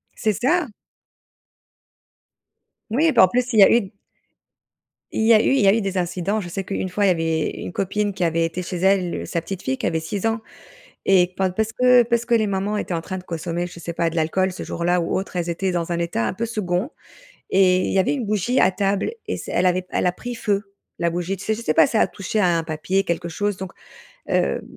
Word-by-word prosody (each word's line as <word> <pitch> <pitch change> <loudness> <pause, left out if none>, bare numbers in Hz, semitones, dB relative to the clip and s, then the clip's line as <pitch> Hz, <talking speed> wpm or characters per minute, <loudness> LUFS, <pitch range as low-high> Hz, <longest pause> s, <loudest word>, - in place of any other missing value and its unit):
C'est 215 - 0
ça! 310 +4 +2 2.2
Oui, 310 +6 +3
bah 235 - +6
en - - +7
plus, 250 +2 -1
il 220 - +4
y - - +10
a - - +6
eu 235 - +5
d 195 +1 -10 1.2
il - - -1
y 230 - +6
a 215 - +7
eu - - -1
il 270 - +3
y 200 - +4
a 195 - +7
eu 225 - +1
des 195 -1 -2
incidents. 180 +3 -1
Je 175 - -7
sais 195 +3 -4
qu'une 190 0 -3
fois, 200 +3 0
il - - +4
y - - +5
avait 165 -2 0
une - - -5
copine 205 +2 -1
qui 185 -2 -3
avait 165 0 +1
été 170 +2 -4
chez 180 +1 -5
elle, 185 -1 +2
heu, - - -6
sa 170 - -2
petite 190 +2 -6
fille 130 0 -2
qui - - -4
avait 160 -1 0
6 190 +6 -4
ans 225 0 0 0.6
et 185 -2 +4
pa 190 -1 +1
parce 220 +4 -2
que 250 +1 +5
parce 235 0 0
que 235 - +1
les 220 -2 +3
mamans 200 +1 -1
étaient 190 - -3
en 165 - -1
train 185 +3 -5
de 180 - -11
consommer, 170 +1 -3
je 170 -1 -11
sais 170 - -5
pas, 170 0 0
de - - -10
l'alcool, 185 +4 +1
ce 180 - -7
jour-là, 175 +1 0
ou 165 - -1
autre, 190 - -6
elles 175 -1 -1
étaient 185 +2 -1
dans 175 -1 -2
un 170 - -1
état 170 -10 -1
un - - -1
peu 230 +5 -3
2nd 210 +1 -2 0.6
et 185 -1 +4
il - - -2
y 195 - +3
avait 190 - +2
une 265 -5 -2
bougie 215 +5 0
à 185 - +4
table 195 - 0 0.2
et - - -2
c - - -7
elle 180 - +2
avait 180 0 +1
elle - - 0
a 180 - +2
pris 245 +6 -7
feu, 200 -2 -2 0.3
la 170 - +1
bougie, 175 +3 -3
tu - - -9
sais? 220 - +1
Je 230 - -7
sais 155 - 0
pas, 155 -2 +5
ça 220 - +1
a - - +3
touché 205 +2 -3
à 175 -4 +3
un 165 - -1
papier 160 +5 -1
quelque 170 0 -2
chose, 205 +3 -1
donc, 190 -2 -6 0.6
hem, - - 0
190 Hz, 255 wpm, -22 LUFS, 175-210 Hz, 2.2 s, y